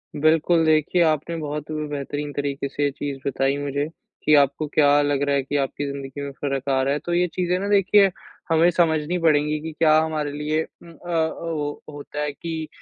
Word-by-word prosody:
बिल्कुल, 160 +2 +3
देखिए 155 +3 +3
आपने 160 +1 0
बहुत 150 -1 -5
ब 155 -1 -3
बेहतरीन 145 +1 -4
तरीके 140 -1 -2
से 145 - -3
ये 145 - +2
चीज़ 140 0 -5
बताई 135 +1 0
मुझे 145 0 -2 0.4
कि 150 - +4
आपको 140 +1 +2
क्या 145 -1 +5
लग 145 -1 0
रहा 140 - +2
है 140 - +1
कि 145 +2 -2
आपकी 140 +1 -2
ज़िन्दगी 140 0 -7
में 140 0 -5
फ़र्क 140 -1 -2
आ 135 -1 +2
रहा 135 +1 +1
है, 145 - -1
तो 175 - -4
ये 175 +1 +2
चीज़ें 180 0 0
ना 200 - -3
देखिए 200 0 +5 0.4
हमें 165 +2 +5
समझनी 165 0 +1
पड़ेंगी 150 -2 +2
कि 160 +1 -5
क्या 155 -1 +5
हमारे 155 -2 -1
लिए 150 +2 -1 0.2
उम, 170 - -13
अ - - -15 0.2
अ, 160 -1 +2
वो 150 -3 -4
होता 145 0 -7
है 150 0 -1
कि 160 +1 -5
150 Hz, 210 wpm, -23 LUFS, 145-160 Hz, 0.4 s, क्या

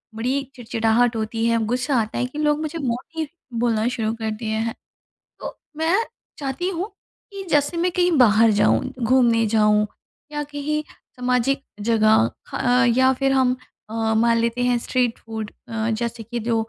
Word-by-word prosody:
बड़ी 255 +5 0
चिड़चिड़ाहट 230 0 +1
होती 225 +1 -2
है, 230 0 +3
ग़ुस्सा 250 +3 0
आता 215 - -4
है 250 - +1
कि 290 +4 -7
लोग 300 0 +2
मुझे 315 +2 -4
मोटी 285 +5 -3 0.3
बोलना 230 -1 +1
शुरू 220 -2 -1
कर 220 -1 -3
दिए 220 -1 -3
हैं। 225 - -3 0.7
तो - - -6 0.2
मैं 320 +3 +1 0.4
चाहती 285 +6 -2
हूँ 370 +2 -3 0.4
कि 395 -1 -6
जैसे 295 +3 +2
मैं 355 +1 +1
कहीं 355 0 +2
बाहर 225 -2 +6
जाऊँ, - - +4 0.2
घूमने 235 -1 +3
जाऊँ, 210 -1 +4 0.5
या 295 0 -2
कहीं 295 +1 -3 0.4
सामाजिक 250 +2 +1 0.3
जगह 215 - +4 0.2
खा 250 +1 +2
या 260 0 +5
फिर 270 +1 0
हम 260 -1 +3 0.3
अ, 225 0 0
मान 230 0 +3
लेते 235 +1 0
हैं 245 -1 +2
स्ट्रीट 245 -1 0
फ़ूड 220 -1 -6 0.2
अ, 225 0 -1
जैसे 235 -1 -3
कि 235 +2 -5
जो 230 +1 -1
245 Hz, 165 wpm, -22 LUFS, 225-280 Hz, 0.7 s, बाहर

